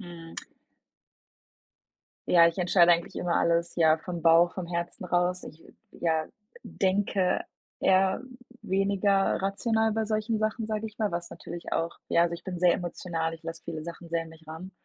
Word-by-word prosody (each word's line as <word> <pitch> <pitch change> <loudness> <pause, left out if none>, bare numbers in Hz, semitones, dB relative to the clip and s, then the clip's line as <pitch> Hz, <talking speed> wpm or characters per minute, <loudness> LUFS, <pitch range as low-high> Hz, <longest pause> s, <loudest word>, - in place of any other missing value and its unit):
Mhm. 170 -3 -10 1.9
Ja, 170 -1 +7
ich 165 - 0
entscheide 175 -1 +5
eigentlich 170 0 -1
immer 175 -1 -1
alles, 170 0 +1
ja, 160 -2 +4
vom 175 0 -6
Bauch, 165 +1 +5
vom 185 -2 -4
Herzen 170 +1 -4
raus. 180 +1 0
Ich, 155 - -11 0.3
ja, 160 -2 -1 0.4
denke 190 -1 0 0.4
eher 190 +2 +3 0.4
weniger 195 0 +1
rational 220 +3 +1
bei 220 0 0
solchen 215 +1 -1
Sachen, 215 +1 -1
sage 215 0 -2
ich 220 +1 -12
mal, 215 -2 0
was 170 0 -4
natürlich 170 +1 -8
auch 165 +1 -1
ja, 170 - +4
also, 170 0 0
ich - - -11
bin 180 -2 -5
sehr 175 -1 +5
emotional, 165 -2 -3
ich 165 - -14
lasse 165 0 -7
viele 160 -2 -5
Sachen 170 +1 -9
sehr 165 0 -1
an 165 - -11
mich 160 0 -16
ran 160 +4 -8
175 Hz, 170 wpm, -28 LUFS, 170-195 Hz, 1.9 s, Ja